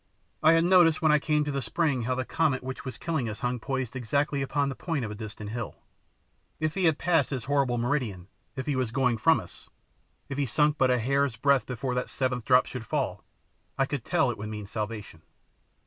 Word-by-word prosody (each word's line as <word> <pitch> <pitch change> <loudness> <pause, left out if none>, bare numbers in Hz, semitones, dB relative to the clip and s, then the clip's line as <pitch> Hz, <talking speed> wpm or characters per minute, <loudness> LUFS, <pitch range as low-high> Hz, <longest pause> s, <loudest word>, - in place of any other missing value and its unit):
I 155 +1 +6
had 165 0 +4
noticed 175 -3 +5
when 155 - +5
I 150 - +5
came 150 0 +1
to 145 - -2
the 140 -1 -2
spring 130 +1 0
how 130 +1 0
the 130 0 -2
comet 155 -6 0
which 130 0 -6
was 130 - -6
killing 155 -9 -2
us 110 - -7
hung 125 -1 -1
poised 130 -1 -3
exactly 140 +3 0
upon 140 +1 0
the 135 - -4
point 160 -6 -2
of 105 - -5
a - - -4
distant 105 -1 -7
hill. 120 -1 -5 0.8
If 155 -1 0
he 190 -2 0
had 160 -3 +4
passed 165 -6 +2
his 130 -5 -3
horrible 135 -3 +1
meridian, 120 -8 -1 0.3
if 130 -2 -4
he 145 - 0
was 130 -3 0
going 120 -1 +1
from - - +4
us, - - -12 0.6
if 135 0 -4
he 140 - +1
sunk 150 +4 +2
but 130 - +4
a 125 - +3
hair's 135 +1 +1
breadth 135 0 +2
before 125 +1 -3
that 125 0 -2
seventh 125 -3 -1
drop 125 -1 +5
should 125 -3 -6
fall, - - -2 0.5
I 135 - +3
could 135 -3 -4
tell 140 -6 +2
it 115 - -8
would 105 +1 -5
mean 105 -1 -6
salvation. 105 -5 -5
130 Hz, 225 wpm, -28 LUFS, 120-145 Hz, 0.8 s, I